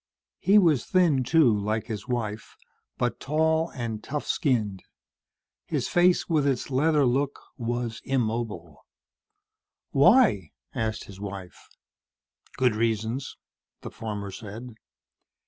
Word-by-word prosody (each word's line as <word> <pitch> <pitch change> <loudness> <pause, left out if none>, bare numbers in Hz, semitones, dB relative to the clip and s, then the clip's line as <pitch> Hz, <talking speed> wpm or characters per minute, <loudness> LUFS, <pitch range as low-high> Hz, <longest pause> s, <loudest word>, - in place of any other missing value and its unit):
He 200 +2 +4
was 165 - +4
thin, 165 -8 +3
too, 130 -4 +4
like 105 +2 -1
his 105 0 -6
wife, 110 -4 -4 0.4
but 120 -2 -1
tall 160 +2 +1
and 115 -4 -5
tough 150 +1 -4
skinned. 110 - 0 0.9
His - - -1
face, 175 0 +3
with 155 -4 +2
its 135 0 -1
leather 150 +2 +3
look 135 +3 0 0.2
was 120 -2 -3
immobile. 110 - -3 1.1
"Why?" 140 - +4 0.2
asked 110 -1 -2
his 100 -1 -12
wife. 95 -3 -8 0.9
"Good 125 -4 +2
reasons," 115 +3 -2 0.4
the - - -8
farmer 105 -3 -5
said. 110 +5 -8
120 Hz, 110 wpm, -26 LUFS, 110-145 Hz, 1.1 s, He